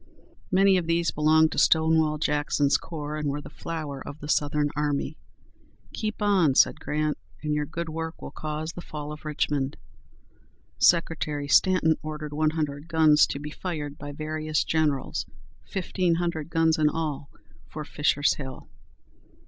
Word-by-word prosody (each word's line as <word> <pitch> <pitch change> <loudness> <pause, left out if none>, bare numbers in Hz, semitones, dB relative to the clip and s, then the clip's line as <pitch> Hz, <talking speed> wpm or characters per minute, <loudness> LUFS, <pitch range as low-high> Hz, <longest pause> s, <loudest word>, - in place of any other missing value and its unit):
Many 195 0 +5
of 175 -2 -2
these 170 0 +1
belonged 155 +1 +4
to - - -1
Stonewall 160 -1 +4
Jackson's 145 -1 +1
corps, 150 -2 -4
and 150 -1 -1
were 140 +1 -2
the - - -11
flower 155 -5 -5
of 145 - -9
the 145 - -8
Southern 145 0 +1
army. 145 +1 -1 0.8
"Keep 215 -1 -3
on," 185 -9 +3
said - - +4
Grant, 150 0 -1 0.2
"and 150 0 0
your 150 0 -1
good 170 +2 -4
work 160 +1 -5
will - - -8
cause 155 +1 -4
the 175 - -7
fall 150 -2 -7
of 150 +1 -9
Richmond." 145 -2 -1 1.0
Secretary 155 -4 +2
Stanton 165 0 +4
ordered 150 -1 -6
one 155 +1 +2
hundred 150 -1 -3
guns 160 -2 +5
to - - -4
be 150 +1 -6
fired 150 -5 -5
by 145 0 -6
various 155 +1 -2
generals, 150 -4 0 0.4
fifteen 180 - 0
hundred 165 -3 -2
guns 160 -1 +2
in 150 -1 +4
all, 150 -3 -3 0.4
for 155 -1 -7
Fisher's 145 -1 +2
Hill. 130 -3 -8
155 Hz, 155 wpm, -26 LUFS, 145-160 Hz, 1.0 s, Many